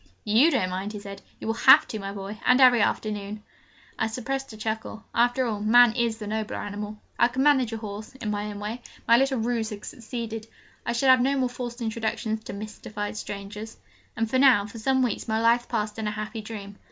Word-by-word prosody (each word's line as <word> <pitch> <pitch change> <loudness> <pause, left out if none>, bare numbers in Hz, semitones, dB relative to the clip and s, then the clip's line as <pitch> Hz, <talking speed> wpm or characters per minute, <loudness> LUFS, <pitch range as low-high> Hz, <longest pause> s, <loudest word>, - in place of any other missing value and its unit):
'You 225 +10 +5
don't 185 - 0
mind!' 190 +3 -4
he 210 - -5
said; 200 -1 -9 0.2
'you - - -8
will 225 - 0
have 230 - +7
to, 220 - -4
my 195 0 -5
boy, 200 +2 -7
and 250 +1 +5
every 250 -3 +7
afternoon!' 210 0 -2 0.6
I 225 - +2
suppressed 265 +4 -4
a 215 - -10
chuckle: 220 0 -4
after 245 +2 +2
all, 215 -3 -2
man 230 +2 +6
is 235 -2 0
the 215 - -7
nobler 215 +1 -3
animal. 205 +1 -5 0.2
I 240 - +6
could 255 +2 -1
manage 265 -5 +4
a 225 - -3
horse 215 +2 -7
in 225 -5 -4
my 205 0 -2
own 205 -1 -6
way. 215 +4 -5 0.3
My 230 - +7
little 270 +1 +2
ruse 230 -1 -1
had 210 -1 -8
succeeded: 225 -2 -6 0.4
I - - +1
should 260 +3 +2
have 255 -1 +7
no 275 +2 +2
more 255 -2 +1
forced 245 -1 -6
introductions 220 -1 -2
to - - -6
mystified 210 0 -6
strangers. 210 +1 -7 0.4
And 225 -1 +1
now 255 -7 +6
for 210 +2 -9
some 260 +3 +2
weeks 245 -1 -2
my 220 0 +1
life 235 +1 +3
passed 215 -2 -2
in 220 - -2
a - - 0
happy 215 +1 -5
dream. 205 -2 -8
220 Hz, 215 wpm, -26 LUFS, 210-245 Hz, 0.6 s, have